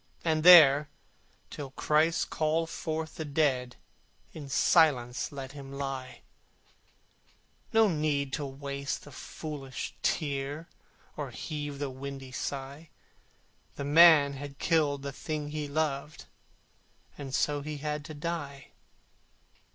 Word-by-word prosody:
And 160 Hz, -1 st, +2 dB
there, 150 Hz, -4 st, +9 dB, 0.6 s
till 140 Hz, -2 st, -6 dB
Christ 155 Hz, +4 st, +1 dB
call 160 Hz, +1 st, +1 dB
forth 160 Hz, 0 st, -5 dB
the 160 Hz, -, -3 dB
dead, 140 Hz, -4 st, 0 dB, 0.6 s
In 145 Hz, -3 st, -9 dB
silence 135 Hz, -6 st, +3 dB
let 135 Hz, -2 st, -7 dB
him 135 Hz, -1 st, -10 dB
lie: 135 Hz, -2 st, -5 dB, 1.5 s
No 225 Hz, -1 st, +5 dB
need 150 Hz, -5 st, -1 dB
to 150 Hz, -, -2 dB
waste 140 Hz, +1 st, -5 dB
the 145 Hz, -, -13 dB
foolish 140 Hz, -1 st, -7 dB
tear, 145 Hz, +1 st, -2 dB, 0.5 s
Or -, -, -4 dB
heave 145 Hz, -2 st, -5 dB
the 140 Hz, -1 st, -3 dB
windy 135 Hz, 0 st, -8 dB
sigh: 140 Hz, +4 st, -5 dB, 0.9 s
The 140 Hz, -, -5 dB
man 150 Hz, -2 st, +7 dB
had 140 Hz, 0 st, -8 dB
killed 150 Hz, -4 st, +1 dB
the 140 Hz, -, -4 dB
thing 150 Hz, +1 st, -5 dB
he 150 Hz, 0 st, -4 dB
loved, 150 Hz, 0 st, -2 dB, 0.9 s
And 135 Hz, -2 st, -5 dB
so 145 Hz, -1 st, 0 dB
he 150 Hz, +1 st, -5 dB
had 150 Hz, 0 st, -3 dB
to 155 Hz, -, -8 dB
die. 145 Hz, -3 st, -5 dB
145 Hz, 120 wpm, -29 LUFS, 140-155 Hz, 1.5 s, there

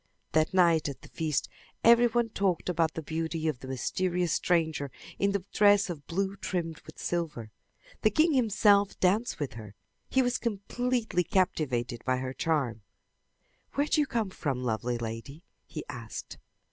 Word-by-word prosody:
That 155 Hz, +3 st, +2 dB
night 170 Hz, -5 st, +4 dB
at 140 Hz, -, -9 dB
the -, -, -12 dB
feast 155 Hz, -3 st, -1 dB, 0.4 s
every 235 Hz, +1 st, +7 dB
one 235 Hz, 0 st, +1 dB
talked 190 Hz, -5 st, 0 dB
about 165 Hz, -2 st, +1 dB
the 160 Hz, -, -4 dB
beauty 160 Hz, +1 st, -2 dB
of 150 Hz, -6 st, -1 dB
the 130 Hz, -, -9 dB
mysterious 175 Hz, +6 st, 0 dB
stranger 160 Hz, -5 st, +1 dB, 0.3 s
in 200 Hz, 0 st, +2 dB
the 200 Hz, -2 st, -1 dB
dress 205 Hz, -2 st, +5 dB
of 145 Hz, -4 st, -9 dB
blue 195 Hz, +3 st, -1 dB
trimmed 170 Hz, -4 st, -3 dB
with -, -, -11 dB
silver. 155 Hz, -11 st, -3 dB, 0.5 s
The 215 Hz, -, +5 dB
king 310 Hz, +9 st, +3 dB
himself 210 Hz, -5 st, +3 dB
danced 205 Hz, +5 st, +2 dB
with 145 Hz, -6 st, -3 dB
her. 105 Hz, -3 st, -10 dB, 0.3 s
He 265 Hz, -, +3 dB
was 245 Hz, 0 st, 0 dB
completely 230 Hz, -1 st, -1 dB
captivated 130 Hz, -, 0 dB
by 130 Hz, 0 st, +1 dB
her 130 Hz, 0 st, -4 dB
charm. 135 Hz, -9 st, 0 dB, 0.9 s
"Where 285 Hz, -, +2 dB
do 305 Hz, -, +2 dB
you 290 Hz, -, 0 dB
come 225 Hz, -7 st, -1 dB
from, 135 Hz, -8 st, -2 dB
lovely 120 Hz, +1 st, -1 dB
lady?" 115 Hz, +7 st, -6 dB, 0.2 s
he 155 Hz, -, -6 dB
asked. 115 Hz, -6 st, -7 dB
170 Hz, 160 wpm, -29 LUFS, 140-205 Hz, 0.9 s, every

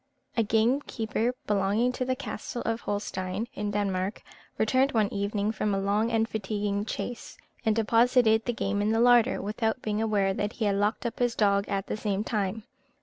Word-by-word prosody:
A 230 Hz, -, +3 dB
gamekeeper 225 Hz, +1 st, 0 dB
belonging 210 Hz, +4 st, +2 dB
to 255 Hz, 0 st, -3 dB
the 255 Hz, 0 st, 0 dB
castle 255 Hz, -2 st, -5 dB
of 230 Hz, 0 st, -1 dB
Holstein 205 Hz, 0 st, -3 dB
(in 210 Hz, 0 st, -3 dB
Denmark), 200 Hz, -1 st, -2 dB, 0.3 s
returned 260 Hz, +5 st, +2 dB
one 215 Hz, -3 st, +1 dB
evening 205 Hz, +1 st, -1 dB
from 215 Hz, -2 st, -1 dB
a -, -, 0 dB
long 205 Hz, +3 st, +1 dB
and 225 Hz, -1 st, +1 dB
fatiguing 205 Hz, -1 st, -2 dB
chase, 240 Hz, +2 st, -5 dB, 0.3 s
and 220 Hz, -, +4 dB
deposited 230 Hz, 0 st, +3 dB
the 245 Hz, -, +1 dB
game 205 Hz, -2 st, -1 dB
in 210 Hz, -, +1 dB
the 225 Hz, -, +2 dB
larder, 245 Hz, 0 st, +5 dB
without 220 Hz, +4 st, -1 dB
being 215 Hz, 0 st, -1 dB
aware 205 Hz, -3 st, +1 dB
that 205 Hz, +2 st, -2 dB
he 225 Hz, -, -2 dB
had 200 Hz, -1 st, +2 dB
locked 210 Hz, +4 st, 0 dB
up 235 Hz, -, -3 dB
his 245 Hz, -2 st, +1 dB
dog 200 Hz, -1 st, +2 dB
at 195 Hz, -1 st, -1 dB
the -, -, -3 dB
same 205 Hz, -2 st, -1 dB
time. 210 Hz, -1 st, -2 dB
215 Hz, 185 wpm, -28 LUFS, 205-230 Hz, 0.3 s, larder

